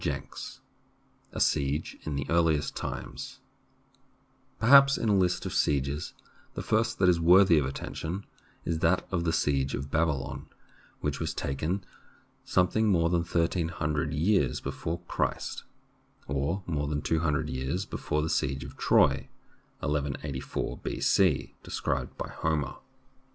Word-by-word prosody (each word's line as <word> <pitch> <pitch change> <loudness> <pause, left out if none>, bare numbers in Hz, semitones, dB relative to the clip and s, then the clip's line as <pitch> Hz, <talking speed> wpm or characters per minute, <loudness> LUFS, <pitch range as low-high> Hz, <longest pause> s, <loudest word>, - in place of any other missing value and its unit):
A - - -5
SIEGE 70 +3 0
IN 75 - -2
THE 70 -1 -2
EARLIEST 80 -3 +2
TIMES - - -6 1.2
PERHAPS 140 +4 +7
in 115 - 0
a 105 - +4
list 90 -2 +1
of - - -3
sieges 70 0 0 0.4
the - - -4
first 110 +2 +1
that 95 - +3
is 90 -2 +4
worthy 85 0 +6
of 70 - -1
attention 80 +7 -5 0.4
is 80 -1 -1
that - - +2
of 90 -2 0
the 80 - +2
siege 70 -4 +1
of 70 +2 -6
Babylon, 80 -3 -1 0.5
which 75 -2 -2
was - - -2
taken 80 +8 -2 0.6
something 110 +5 +2
more 85 -4 +3
than 85 -1 +2
thirteen 85 0 0
hundred 75 -2 -2
years 75 - +2
before 85 +2 -4
Christ, - - -2 0.6
or 70 +8 -1
more 75 -4 -1
than 75 0 -2
two 80 - +1
hundred 75 -3 0
years 65 +9 -2
before 75 -4 -2
the - - -1
siege 70 0 0
of - - -10
Troy - - +3 0.5
(1184 70 -2 -3
B.C.) 90 -7 +1
described 65 -2 -3
by - - -4
Homer. 75 -4 -2
80 Hz, 135 wpm, -29 LUFS, 70-90 Hz, 1.2 s, PERHAPS